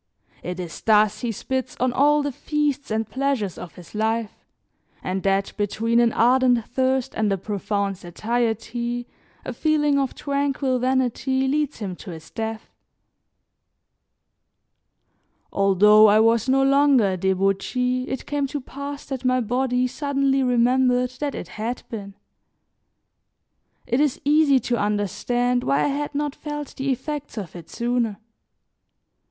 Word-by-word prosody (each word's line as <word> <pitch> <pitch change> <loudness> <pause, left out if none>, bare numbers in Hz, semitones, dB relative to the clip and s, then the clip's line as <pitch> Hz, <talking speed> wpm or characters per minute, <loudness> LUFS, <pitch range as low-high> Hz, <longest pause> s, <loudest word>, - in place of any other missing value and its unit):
It 180 +1 -5
is 170 -4 -7
thus 215 -1 +3
he 240 - -2
spits 260 +3 -4
on 255 0 +1
all 295 +2 +3
the 285 - -2
feasts 290 +1 -2
and 220 0 -1
pleasures 255 -5 -1
of 175 - -9
his 180 -2 -14
life, 220 +1 -1 0.7
and 185 +1 -2
that 195 0 0
between 220 +3 +1
an 235 -1 +4
ardent 245 -1 +3
thirst 260 0 0
and 215 -2 0
a 195 - +1
profound 200 0 -2
satiety 235 +5 -2 0.4
a - - -4
feeling 295 -2 +2
of 270 -2 -2
tranquil 280 -2 -1
vanity 260 +1 0
leads 295 +1 0
him 195 -5 -5
to 200 - -10
his 160 -2 -10
death. 220 0 -5 2.8
Although 210 +2 +6
I 210 +1 +5
was 230 +2 +3
no 270 +1 +4
longer 275 -6 +4
a 185 - -2
debauchee 195 +7 0
it 265 - -4
came 290 -1 -1
to 290 +2 -4
pass 280 +2 -7
that 270 -2 -5
my 255 0 +2
body 250 +2 0
suddenly 275 0 0
remembered 250 0 +2
that 290 -2 -2
it - - -6
had 225 +6 -5
been. 200 -3 -7 1.7
It 245 +2 0
is 295 -3 +1
easy 295 -2 +4
to 240 - -1
understand 210 +5 0
why 140 +2 +2
I - - +2
had 290 +1 -3
not 290 -1 -1
felt 295 -2 -7
the 270 +1 -3
effects 290 0 -5
of 190 -6 -6
it 170 -2 -10
sooner. 235 -3 -1
245 Hz, 140 wpm, -23 LUFS, 210-270 Hz, 2.8 s, Although